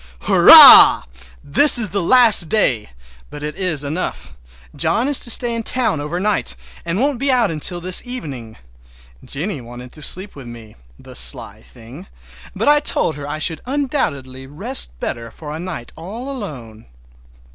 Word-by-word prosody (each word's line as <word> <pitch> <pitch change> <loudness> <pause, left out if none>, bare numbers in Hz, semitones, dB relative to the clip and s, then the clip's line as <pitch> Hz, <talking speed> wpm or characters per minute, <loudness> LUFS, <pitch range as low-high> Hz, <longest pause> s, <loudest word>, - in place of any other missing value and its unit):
Hurrah! - - +7 0.4
This 285 - +5
is 220 -4 +1
the 200 +1 -2
last 220 -4 +3
day, 130 - -1 0.4
but 145 - -11
it 150 0 -6
is 170 -5 -2
enough. 145 - -6 0.4
John 245 - -1
is 290 -2 +3
to - - -1
stay 240 0 +2
in 230 - -4
town 225 - -3
over 155 +4 -6
night, 210 +2 -1 0.3
and 170 +3 -4
won't 275 -1 -2
be 275 +1 -2
out 240 -7 0
until 165 +3 -1
this 180 +1 +2
evening. 140 - -9 0.7
Jennie 155 +1 -5
wanted 120 +1 -13
to 155 - -15
sleep 190 +6 0
with 135 -4 -12
me—the 105 - -16
sly 60 0 +1
thing! 125 +11 -15 0.5
but - - -4
I 295 0 +4
told 165 - -2
her 145 -1 -9
I 145 - -6
should 160 +1 -2
undoubtedly 155 - -5
rest - - -3
better 115 - -6
for 150 +5 -10
a - - -8
night 170 -9 -9
all 225 +11 -9
alone. 125 - -10
160 Hz, 160 wpm, -17 LUFS, -, 0.7 s, Hurrah